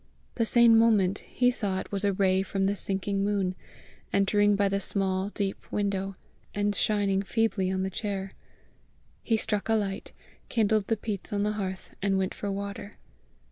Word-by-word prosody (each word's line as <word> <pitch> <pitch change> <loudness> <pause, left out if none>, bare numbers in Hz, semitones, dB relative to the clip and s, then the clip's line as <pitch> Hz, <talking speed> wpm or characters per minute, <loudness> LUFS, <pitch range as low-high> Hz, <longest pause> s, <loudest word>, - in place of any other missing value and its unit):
The 230 - 0
same 230 -1 +6
moment 205 -4 +3
he 250 0 +1
saw 200 -6 -1
it - - -8
was 200 0 0
a 200 - +3
ray 190 -1 +2
from 195 0 -1
the 200 +1 +1
sinking 195 0 -2
moon, 200 -2 0 0.6
entering 205 +1 +3
by 200 0 +2
the 195 0 0
small, 190 0 0
deep 200 -2 -4
window, 195 -1 -1 0.4
and 205 0 +1
shining 200 -2 +1
feebly 200 -2 0
on 190 0 -1
the 190 - -2
chair. 195 -1 -4 0.9
He 225 - +1
struck 210 0 -1
a 225 - +4
light, 195 -2 -2 0.4
kindled 215 -3 +2
the 225 - +1
peats 205 -2 -4
on 205 -1 0
the 210 - +1
hearth, 190 -3 -5
and 195 -1 +1
went 190 -1 -1
for 205 - -4
water. 200 +1 -6
200 Hz, 175 wpm, -28 LUFS, 195-210 Hz, 0.9 s, same